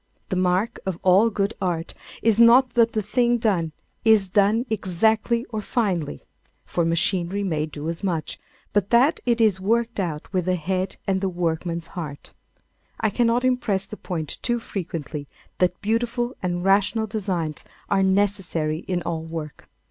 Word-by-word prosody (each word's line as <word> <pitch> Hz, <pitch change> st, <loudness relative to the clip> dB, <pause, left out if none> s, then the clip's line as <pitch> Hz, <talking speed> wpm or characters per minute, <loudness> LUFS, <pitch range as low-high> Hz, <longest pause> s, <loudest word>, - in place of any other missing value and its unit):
The 190 Hz, -, -1 dB
mark 185 Hz, +4 st, +1 dB
of 190 Hz, -3 st, -3 dB
all 190 Hz, +5 st, +5 dB
good 200 Hz, 0 st, -1 dB
art 170 Hz, -3 st, -2 dB, 0.3 s
is 225 Hz, -1 st, +3 dB
not 245 Hz, +2 st, +7 dB
that 230 Hz, -1 st, +3 dB
the 215 Hz, -, 0 dB
thing 240 Hz, +3 st, +2 dB
done 190 Hz, -8 st, 0 dB, 0.3 s
is 215 Hz, -4 st, +4 dB
done 210 Hz, +5 st, +3 dB
exactly 220 Hz, +3 st, +1 dB
or 215 Hz, -2 st, -2 dB
finely, 185 Hz, -, -1 dB, 0.4 s
for 175 Hz, -, -1 dB
machinery 175 Hz, +3 st, 0 dB
may 155 Hz, -5 st, -1 dB
do 150 Hz, 0 st, -7 dB
as 165 Hz, +3 st, -4 dB
much, 170 Hz, -5 st, -2 dB, 0.3 s
but 205 Hz, -2 st, +1 dB
that 255 Hz, +7 st, +4 dB
it 235 Hz, -1 st, +2 dB
is 215 Hz, -4 st, +3 dB
worked 230 Hz, +3 st, 0 dB
out 170 Hz, -1 st, -4 dB
with 180 Hz, -2 st, 0 dB
the 185 Hz, 0 st, +2 dB
head 185 Hz, +3 st, -2 dB
and 190 Hz, -1 st, 0 dB
the 195 Hz, -, 0 dB
workman's 170 Hz, -1 st, -2 dB
heart. 150 Hz, -6 st, -7 dB, 0.7 s
I 220 Hz, -2 st, +1 dB
cannot 240 Hz, +3 st, +2 dB
impress 235 Hz, -7 st, +1 dB
the 205 Hz, -, -8 dB
point 165 Hz, -7 st, -5 dB
too 240 Hz, -1 st, 0 dB
frequently 160 Hz, -8 st, -5 dB, 0.3 s
that 180 Hz, -1 st, +2 dB
beautiful 240 Hz, +3 st, -1 dB
and 175 Hz, -1 st, -2 dB
rational 205 Hz, +3 st, +3 dB
designs 185 Hz, -8 st, -3 dB, 0.2 s
are 195 Hz, -, +2 dB
necessary 190 Hz, -5 st, +1 dB
in 180 Hz, -2 st, -1 dB
all 165 Hz, -1 st, -2 dB
work. 160 Hz, -2 st, -7 dB
195 Hz, 160 wpm, -24 LUFS, 170-220 Hz, 0.7 s, not